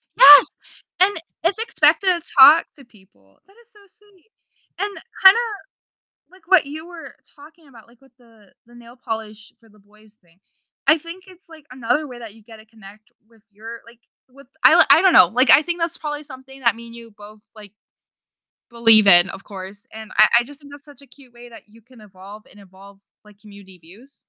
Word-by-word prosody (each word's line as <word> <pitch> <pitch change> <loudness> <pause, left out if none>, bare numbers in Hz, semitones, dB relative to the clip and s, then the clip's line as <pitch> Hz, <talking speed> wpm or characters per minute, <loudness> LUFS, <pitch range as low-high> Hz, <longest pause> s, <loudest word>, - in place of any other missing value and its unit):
Yes, 285 +1 +7 0.5
and 390 0 +1 0.3
it's 375 +5 -2
expected 450 -3 0
to 355 -2 0 0.2
talk 295 +5 +6
to 275 - -19
people, 105 - -28
that 395 - -27
is 475 - -28
so 420 - -23
sweet, 415 0 -29 0.5
and 405 - -4 0.3
kinda, 385 +4 +6 0.9
like, 375 -2 -25
what 370 -6 +2
you 310 +3 -11
were 345 -2 -14 0.2
talking 305 +1 -20
about, 230 -4 -20
like, 235 0 -27
with 270 -2 -28
the 225 -4 -26
the 240 - -23
nail 240 0 -18
polish 220 -3 -10
for 225 - -26
the 210 - -26
boys 210 +1 -26
thing, 170 +1 -32 0.5
I 315 - +2
think 335 +4 -14
it's, 370 -1 -20
like, 315 -3 -19
another 255 +4 -4
way 250 -3 -13
that 225 -3 -13
you 225 - -22
get 225 +1 -17
to 215 - -20
connect 215 -1 -20 0.2
with 225 -2 -29
your, 225 +3 -13
like, 230 0 -21 0.3
with 275 +2 -21 0.2
I - - +5
I - - +5
don't 375 - +2
know, - - +5
like, 250 +3 0
I 295 - +5
think 345 +2 -7
that's 335 0 -4
probably 295 -1 -8
something 265 -1 -15
that 235 -4 -1
me 235 0 -14
and 230 - -16
you 230 -1 -15
both, 210 0 -18 0.2
like 210 -2 -15 1.0
believe 225 -3 +4
in, 175 0 +5
of 195 - -12
course, 195 +1 -13
and 220 -1 -13
I 215 - +5
I - - -4
just 285 +3 -14
think 285 -1 -17
that's 285 0 -16
such 285 -1 -18
a 280 - -21
cute 260 -1 -22
way 240 0 -16
that 230 -1 -17
you 225 +2 -23
can 240 0 -22
evolve 200 +1 -16
and 205 - -21
evolve, 195 0 -20 0.2
like, 210 -1 -23
community 200 -3 -18
views. 200 +12 -21
235 Hz, 210 wpm, -18 LUFS, 210-295 Hz, 1.0 s, Yes